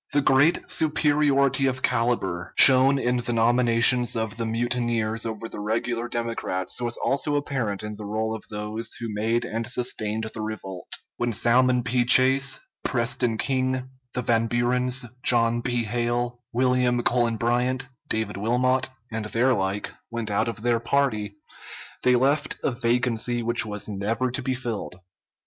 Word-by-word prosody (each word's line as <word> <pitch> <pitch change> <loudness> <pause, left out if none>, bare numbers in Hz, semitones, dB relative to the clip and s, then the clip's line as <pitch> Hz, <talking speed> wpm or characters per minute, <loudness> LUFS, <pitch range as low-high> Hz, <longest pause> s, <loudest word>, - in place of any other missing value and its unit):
The 145 - +3
great 140 +6 +3
superiority 145 -3 +2
of 130 0 -3
caliber 115 -7 -1
shown 135 +1 +7
in 125 -1 0
the 120 0 -2
nominations 120 +1 +3
of 110 -1 -3
the 115 -1 -2
mutineers 115 -1 -1
over 110 0 -5
the - - -8
regular 115 +3 -2
Democrats 115 -5 -2
was 120 -1 -2
also 145 +2 -1
apparent 125 -9 -2
in 105 0 -5
the 105 0 -9
roll 110 +2 -2
of 110 - -7
those 110 +2 -3
who 115 -3 -6
made 110 +3 0
and 115 +1 -4
sustained 110 -3 -1
the 110 - -5
revolt. 95 -4 -6 0.3
When 120 -1 -1
Salmon 125 +2 +3
P. 120 +1 +1
Chase, 130 +2 +4 0.2
Preston 120 -2 0
King, 130 0 -1 0.2
the 125 - -1
Van 115 0 +1
Burens, 125 +2 0 0.2
John 120 -1 +3
P. 120 -1 -1
Hale, 120 +2 -2
William 125 0 +1
Cullen 120 -2 +1
Bryant, 125 +3 0 0.2
David 110 -2 -2
Wilmot, 125 +5 +1 0.2
and 110 -1 -4
their 120 +5 +2
like 100 -1 -2 0.2
went 115 -2 -4
out 110 +3 +1
of 115 -1 -6
their 120 -1 +2
party, 115 -5 -1 0.7
they 125 0 +4
left 140 +4 +1
a - - +1
vacancy 120 -1 0
which 120 -1 +2
was 105 -1 -4
never 110 +5 -2
to 130 - -3
be 130 0 -2
filled. 120 -7 -5
120 Hz, 155 wpm, -24 LUFS, 110-125 Hz, 0.7 s, shown